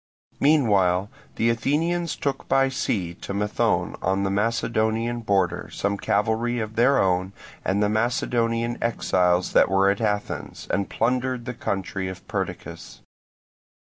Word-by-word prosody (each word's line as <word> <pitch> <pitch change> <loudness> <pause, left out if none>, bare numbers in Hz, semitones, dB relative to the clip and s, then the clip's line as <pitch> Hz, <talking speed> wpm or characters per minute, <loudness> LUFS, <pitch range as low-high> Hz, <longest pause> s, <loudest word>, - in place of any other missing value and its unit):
Meanwhile 100 - +3 0.2
the 115 +1 +2
Athenians 165 +8 0
took 140 -1 -3
by 135 0 +3
sea 95 -9 -2
to 100 - -5
Methone 105 +1 0
on 95 +2 0
the 95 - 0
Macedonian 115 +2 0
border 95 -5 0
some 100 0 -1
cavalry 110 +4 0
of 110 0 -4
their 125 +4 +4
own 95 -1 +1 0.3
and 100 +2 +1
the - - +3
Macedonian 115 +1 0
exiles 90 -6 +1
that - - +5
were 95 0 +4
at 100 - -3
Athens, 105 -2 -3
and 100 -1 0
plundered 125 +1 -1
the 125 - -4
country 95 -4 -3
of 95 0 -8
Perdiccas. - - -5
110 Hz, 135 wpm, -24 LUFS, 95-120 Hz, 0.3 s, that